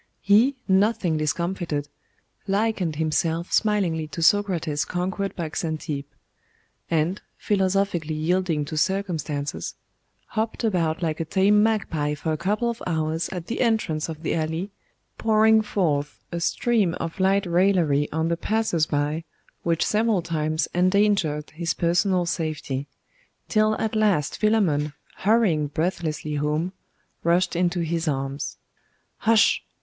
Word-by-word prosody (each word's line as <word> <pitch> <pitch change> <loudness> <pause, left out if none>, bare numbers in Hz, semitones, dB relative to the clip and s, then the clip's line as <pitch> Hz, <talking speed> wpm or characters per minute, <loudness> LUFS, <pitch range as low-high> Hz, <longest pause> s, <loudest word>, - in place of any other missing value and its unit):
He, 220 +8 +5
nothing 190 -4 +2
discomfited, 160 -1 -2 0.6
likened 195 -5 0
himself 160 +2 0
smilingly 185 -8 +1
to 165 +2 -4
Socrates 170 -6 +2
conquered 190 +2 -3
by 165 -3 -4
Xantippe; 155 -4 -3 0.8
and, 165 +4 0 0.2
philosophically 190 -5 0
yielding 165 -1 0
to 155 +1 -5
circumstances, 155 -6 -2 0.5
hopped 220 +2 -2
about 175 -6 0
like 160 -2 -1
a 165 - -1
tame 195 +5 +4
magpie 170 -9 0
for 160 +2 -3
a 155 - 0
couple 210 +7 0
of 235 0 -3
hours 160 -1 -1
at 180 -3 -5
the 230 - -3
entrance 215 -10 0
of 160 0 -7
the - - 0
alley, 160 +5 -2 0.5
pouring 220 0 +4
forth 150 -9 -1
a 170 - -2
stream 205 0 +1
of 165 +3 -5
light 195 +1 +3
raillery 170 -5 +2
on 160 +1 0
the 170 0 0
passers 210 -5 0
by, 150 +2 -1 0.4
which 165 -1 +1
several 215 -4 +1
times 155 -2 -1
endangered 185 -5 +2
his 165 +1 -2
personal 175 +1 +2
safety; 155 -5 -3 0.6
till 215 0 +2
at 220 0 -2
last 205 -9 +2
Philammon, 170 -10 +2 0.2
hurrying 195 -8 +2
breathlessly 155 -1 -2
home, 150 +5 -1 0.5
rushed 170 +1 +2
into 175 0 +1
his 165 0 -1
arms. 135 -1 -3 0.6
'Hush! 225 -1 +4
170 Hz, 125 wpm, -24 LUFS, 155-200 Hz, 0.8 s, He